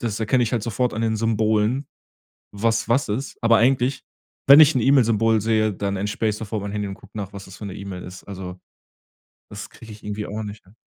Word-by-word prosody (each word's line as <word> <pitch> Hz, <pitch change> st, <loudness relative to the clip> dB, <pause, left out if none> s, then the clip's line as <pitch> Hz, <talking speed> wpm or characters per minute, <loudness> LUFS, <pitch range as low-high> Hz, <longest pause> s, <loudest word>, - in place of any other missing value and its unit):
das 115 Hz, -5 st, -3 dB
erkenne 120 Hz, +3 st, +2 dB
ich 115 Hz, -, -4 dB
halt 115 Hz, -4 st, 0 dB
sofort 120 Hz, +2 st, -1 dB
an 110 Hz, -, -2 dB
den 110 Hz, -1 st, 0 dB
Symbolen, 110 Hz, +3 st, +1 dB, 0.7 s
was 115 Hz, +3 st, 0 dB
was 120 Hz, +3 st, +2 dB
ist. 125 Hz, +6 st, -3 dB
Aber 115 Hz, -1 st, +5 dB
eigentlich, 130 Hz, +2 st, +2 dB, 0.5 s
wenn 140 Hz, +1 st, +10 dB
ich 155 Hz, 0 st, +8 dB
'n 130 Hz, -, +2 dB
E-Mail-Symbol 115 Hz, -4 st, +3 dB
sehe, 110 Hz, 0 st, +1 dB
dann 100 Hz, +1 st, -3 dB
entsperre 105 Hz, +3 st, -1 dB
ich 105 Hz, -, -4 dB
sofort 110 Hz, -1 st, -4 dB
mein 100 Hz, -, -5 dB
Handy 105 Hz, -1 st, -3 dB
und 95 Hz, -, -6 dB
guck -, -, -19 dB
nach, 100 Hz, -2 st, -5 dB
was 100 Hz, -1 st, -9 dB
das 95 Hz, -1 st, -12 dB
für 105 Hz, -, -7 dB
'ne 95 Hz, -, -7 dB
E-Mail 95 Hz, -2 st, -7 dB
ist. 90 Hz, +1 st, -10 dB
Also, 95 Hz, -2 st, -8 dB, 0.9 s
das 105 Hz, 0 st, -8 dB
krieg 115 Hz, -, -14 dB
ich 105 Hz, 0 st, -12 dB
irgendwie 105 Hz, 0 st, -4 dB
auch 110 Hz, +1 st, -5 dB
nicht 105 Hz, +1 st, -8 dB
hin. 95 Hz, +3 st, -23 dB
110 Hz, 225 wpm, -22 LUFS, 100-115 Hz, 0.9 s, wenn